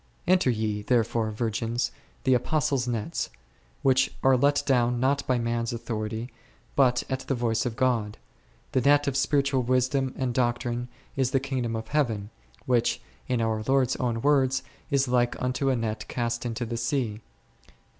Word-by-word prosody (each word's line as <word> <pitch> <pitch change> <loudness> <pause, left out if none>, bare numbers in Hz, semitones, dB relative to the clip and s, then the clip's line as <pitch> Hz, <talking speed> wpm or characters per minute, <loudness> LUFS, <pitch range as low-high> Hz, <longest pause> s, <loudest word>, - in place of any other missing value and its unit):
Enter 180 -6 +4
ye, 110 -3 -1
therefore, 115 0 +1
virgins, 115 +2 -1 0.3
the 130 - +4
Apostles' 135 0 +1
nets, 110 -7 -2 0.5
which 130 -1 +3
are 135 0 +6
let 145 +3 +3
down 125 -3 +2
not 135 +3 +2
by 130 - +2
man's 115 0 -1
authority, 110 0 -4 0.4
but 125 -3 +3
at 130 -1 -2
the 135 - +1
voice 120 0 0
of 115 - -4
God; 115 -5 0 0.5
the 130 - +2
net 145 +3 +4
of 140 - 0
spiritual 140 -1 +2
wisdom 130 +2 +1
and 130 -2 -1
doc 120 -1 +2
trine 120 0 -3 0.3
is 130 -2 +1
the 135 - +2
Kingdom 130 -4 -2
of 110 0 -5
Heaven, 115 -9 0 0.3
which, 120 -2 +2 0.3
in 125 -2 0
our 110 -1 0
Lord's 135 -2 +3
own 115 -2 -1
words, 135 -2 +3 0.3
is 140 -2 +2
like 120 -1 +1
unto 125 +2 0
a 130 - +2
net 110 -2 -3
cast 120 0 -2
into 115 +1 -3
the 115 +1 -4
sea 115 -3 -1
c. - - -16
125 Hz, 165 wpm, -27 LUFS, 115-135 Hz, 0.5 s, are